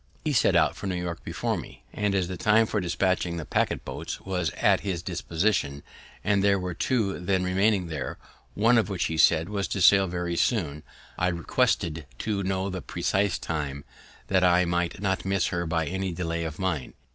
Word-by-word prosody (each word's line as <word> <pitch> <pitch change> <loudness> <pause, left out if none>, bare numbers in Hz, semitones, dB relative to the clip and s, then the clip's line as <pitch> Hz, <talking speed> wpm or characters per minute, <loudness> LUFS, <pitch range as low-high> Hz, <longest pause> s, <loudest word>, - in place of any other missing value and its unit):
He 150 - +1
set 120 - +3
out - - +3
for - - -6
New 95 - -1
York 85 -1 -5
before - - -2
me; - - -10
and, 105 -1 0
as 95 -2 +1
the 95 - -4
time 105 +4 +4
for 105 -1 -1
dispatching 90 -1 0
the 80 - -5
packet - - 0
boats - - -5
was 90 -4 -2
at - - +4
his 90 -4 -3
disposition, 85 -4 -1 0.4
and 100 0 +2
there 100 -1 +4
were 90 -1 -3
two 105 0 0
then 90 +1 0
remaining 95 +1 +2
there, 80 -5 -4 0.4
one 115 +3 +4
of 105 - -1
which, 95 -3 -1
he 80 - -2
said, 80 0 +5
was 100 -2 -2
to 95 - -3
sail 95 +1 +6
very 85 0 -2
soon, 80 - 0 0.4
I 90 - +2
requested 85 - 0
to 105 - -2
know 95 0 -1
the 95 -1 -4
precise 100 -1 0
time, 70 -3 -4 0.4
that 95 -1 +2
I 90 0 +5
might 85 0 -1
not 95 -2 0
miss 95 -1 +1
her 85 -2 -2
by 80 0 0
any 95 +3 -2
delay 85 -1 -2
of 80 -1 -5
mine. 90 -8 -2
90 Hz, 195 wpm, -26 LUFS, 85-100 Hz, 0.4 s, sail